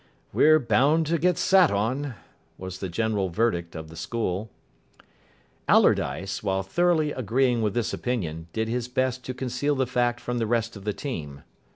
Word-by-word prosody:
"We're 155 +1 +6
bound 150 +5 +3
to 170 - +2
get 180 +1 +2
sat 185 -3 +5
on," 125 +6 -1 0.4
was 95 0 -7
the 95 - -4
general 105 0 0
verdict 85 -3 -1
of 80 0 -7
the 80 - -11
school. 105 +2 -3 1.2
Allardyce, 95 0 +2
while 95 -2 -1
thoroughly 160 - +1
agreeing 125 0 +1
with 105 -2 -1
this 120 -2 -1
opinion, 85 -10 -3
did 110 +3 -2
his 120 +1 -2
best 130 0 -1
to 130 - -5
conceal 130 +3 -1
the 130 -1 +1
fact 120 -1 0
from 120 0 -3
the 115 - 0
rest 115 0 0
of 100 -1 -11
the 105 - 0
team. 75 - -6
115 Hz, 170 wpm, -26 LUFS, 95-130 Hz, 1.2 s, We're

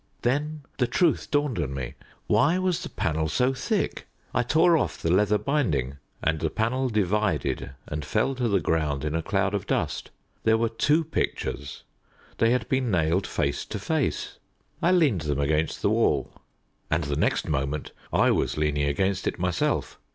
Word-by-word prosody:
Then 145 +4 0 0.2
the 125 - +3
truth 165 +6 +1
dawned 145 - +1
on 70 -5 -2
me. 65 -3 -4 0.3
Why 165 +5 +3
was 185 -2 0
the - - -6
panel 80 -1 -1
so 125 +7 +2
thick? 130 - -2 0.3
I 125 - +3
tore 165 +7 +4
off 155 - 0
the 85 - 0
leather 105 +3 +4
binding, 80 - 0 0.3
and 80 0 +1
the 80 - 0
panel 125 +7 0
divided 105 - 0
and 75 0 -4
fell 135 - +1
to 125 -2 -1
the 100 -3 +2
ground 75 -4 0
in 75 - -1
a 80 - 0
cloud 100 +2 0
of 100 -2 -2
dust. - - -1 0.3
There 110 0 +4
were 115 0 +1
two 150 +8 +2
pictures 70 - -3 0.6
they 115 - +4
had 120 -2 +1
been 130 -2 +1
nailed 85 0 +1
face 70 - -1
to - - -5
face. - - -2 0.4
I 175 - +3
leaned 150 - +3
them 75 -2 -1
against 75 +2 0
the - - +3
wall, - - +1 0.6
and 85 0 +1
the 70 0 -2
next 75 - +1
moment 70 0 -2 0.2
I - - +4
was - - 0
leaning 75 -1 +1
against 95 +7 0
it - - -1
myself. 90 0 -1
100 Hz, 175 wpm, -26 LUFS, -, 0.6 s, tore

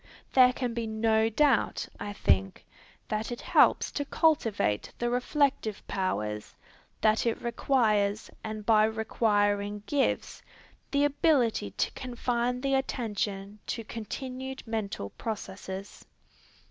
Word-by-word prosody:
There 255 -1 +7
can 250 -2 -3
be 230 -1 -2
no 220 0 +2
doubt, 270 +1 +2
I 205 - -4
think, 95 - +1 0.4
that 215 +2 -2
it 240 - -4
helps - - +4
to 290 - -2
cultivate 235 - +1
the 240 0 -1
reflective 250 -3 0
powers; 105 - -2 0.5
that 215 +2 +3
it 230 - 0
requires, 220 -4 +1
and 215 -1 -5
by 215 -1 +5
requiring 205 -2 0
gives, 280 +4 0 0.5
the 285 0 +2
ability 280 - +2
to - - +1
confine 245 0 -2
the 275 0 0
attention 210 -6 -2
to 230 - -3
continued 260 +4 -6
mental 210 - -3
processes. 195 -2 -6
225 Hz, 115 wpm, -29 LUFS, 205-250 Hz, 0.5 s, There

